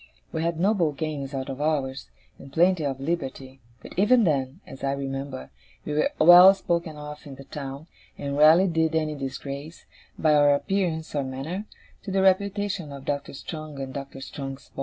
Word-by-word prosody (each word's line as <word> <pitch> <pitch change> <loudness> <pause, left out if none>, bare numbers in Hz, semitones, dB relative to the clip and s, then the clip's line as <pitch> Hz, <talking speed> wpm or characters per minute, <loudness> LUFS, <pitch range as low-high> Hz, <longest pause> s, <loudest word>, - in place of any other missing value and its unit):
We 160 - -2
had 165 0 -1
noble 180 -5 +2
games 145 -2 -4
out 130 -1 -3
of 135 +1 -5
hours, 140 -3 -1 0.3
and 135 - -12
plenty 175 +2 +3
of 135 -2 -2
liberty; 135 -3 -4 0.2
but - - -10
even 230 +5 +5
then, 135 -6 0
as 135 - -11
I 135 0 +1
remember, 135 - -5 0.3
we - - -3
were 150 - +2
well 175 +4 +9
spoken 170 -4 -2
of 150 0 -8
in 140 - -9
the 135 - -11
town, 140 +1 -7 0.3
and 140 0 -4
rarely 155 +5 +7
did 160 -2 +1
any 155 -1 0
disgrace, 140 +2 -7 0.3
by 155 -1 +3
our 145 -1 +5
appearance 170 -1 -2
or 145 -2 0
manner, 140 +10 -5 0.4
to - - -8
the 190 0 +1
reputation 195 -3 +1
of 140 -1 -9
Doctor 140 -1 -3
Strong 155 -1 -7
and 135 -1 -5
Doctor 135 -1 -7
Strong's 135 0 -7
boys. - - -12
150 Hz, 180 wpm, -25 LUFS, 135-170 Hz, 0.4 s, well